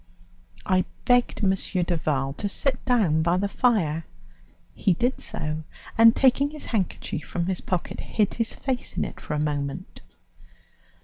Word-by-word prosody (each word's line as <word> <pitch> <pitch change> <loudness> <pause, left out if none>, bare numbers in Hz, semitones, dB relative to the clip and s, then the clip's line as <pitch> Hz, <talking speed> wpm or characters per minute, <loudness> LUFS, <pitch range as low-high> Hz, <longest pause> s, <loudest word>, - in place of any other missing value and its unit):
I 185 -1 +2 0.2
begged 245 -3 +3
M. 190 -1 +4 0.3
Duval 155 -6 -1
to 200 +7 -3
sit 260 +5 -1
down 205 -12 +3
by 170 +2 +2
the 200 +2 +1
fire; 185 -9 +1 0.7
he 190 -4 +2
did 245 +8 0
so, 155 0 -3 0.3
and, 230 0 +7
taking 275 +2 +4
his 300 0 -8
handkerchief 185 -7 -2
from 170 - -2
his 185 0 -2
pocket, 180 -2 -3
hid 210 -3 0
his 230 -1 -2
face 260 -2 -3
in - - +1
it - - -9
for - - -3
a - - -1
moment. 145 +3 -3
185 Hz, 150 wpm, -25 LUFS, 155-240 Hz, 0.7 s, and